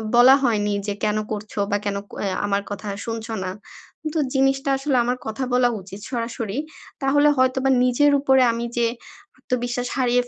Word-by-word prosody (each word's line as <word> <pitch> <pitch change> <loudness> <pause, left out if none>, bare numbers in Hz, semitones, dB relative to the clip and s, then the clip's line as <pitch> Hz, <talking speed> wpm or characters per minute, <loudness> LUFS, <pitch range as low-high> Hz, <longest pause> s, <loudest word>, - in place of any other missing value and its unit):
বলা 250 +3 +8
হয়নি 210 -4 +1
যে 205 - 0
কেন 215 0 +1
করছো 210 0 -5
বা 205 - +3
কেন 200 -1 -1 0.2
অ্যাঁ 195 -2 -1
আমার 200 0 0
কথা 205 +1 -6 0.2
শুনছো 225 0 -4
না। 185 - -3 0.6
তো 320 - 0
জিনিসটা 270 +1 +2
আসলে 270 0 -1
আমার 245 +1 -1
কথা 220 +4 -3
বলা 250 0 +4
উচিত 195 +2 -10
সরাসরি 230 -3 -3 0.4
তাহলে 290 +2 +4
হয়তোবা 260 +1 +2 0.2
নিজের 290 +4 +4
উপরে 265 -1 +4
আমি 230 +1 -3
যে 235 -1 +3 0.5
আত্মবিশ্বাস 245 -1 -2
হারিয়ে 245 -1 +2
245 Hz, 165 wpm, -22 LUFS, 215-265 Hz, 0.6 s, বলা